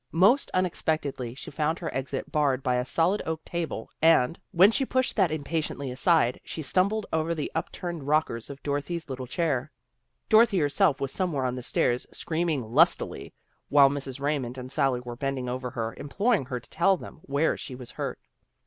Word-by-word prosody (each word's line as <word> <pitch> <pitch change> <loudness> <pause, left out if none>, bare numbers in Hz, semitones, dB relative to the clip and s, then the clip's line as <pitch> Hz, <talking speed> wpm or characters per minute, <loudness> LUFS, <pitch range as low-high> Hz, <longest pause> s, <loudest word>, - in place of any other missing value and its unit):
Most 200 - +4
unexpectedly 155 -8 -1
she - - -8
found 155 +3 0
her 170 - -5
exit 135 0 -4
barred 140 -4 +1
by 125 -1 +1
a 125 - -1
solid 170 +9 +2
oak 160 -1 -4
table 165 -9 -4
and, 160 -3 +4
when 190 +5 +6
she 270 - +1
pushed 260 0 0
that 190 -5 +3
impatiently 155 -3 -3
aside, 130 -1 +2
she 160 - -6
stumbled 200 +8 +1
over 160 +1 0
the 150 - -3
up 160 - -2
turned 170 -6 -5
rockers 145 -6 0
of 140 0 -9
Dorothy's 145 +3 -3
little 130 -1 -5
red - - -27
chair. 145 -7 -1 0.6
Dorothy 220 -2 +5
herself 145 -2 +2
was 135 -1 -2
somewhere 155 -6 -1
on 125 - 0
the 125 - -5
stairs, 120 0 0
screaming 160 -8 -2
lustily, 165 +5 +2 0.4
while 140 -1 +6
Mrs. 140 -2 -5
Raymond 140 -3 -2
and 130 0 -7
Sally 135 -3 +1
were 120 -1 -7
bending 135 0 -3
over 125 0 -3
her, 115 -2 -3
imploring 200 - 0
her 125 -1 -4
to - - -20
tell 190 +3 +3
them - - -11
where 140 +3 +1
she 130 - -7
was 125 -1 -9
hurt. - - -4
145 Hz, 185 wpm, -27 LUFS, 130-170 Hz, 0.6 s, when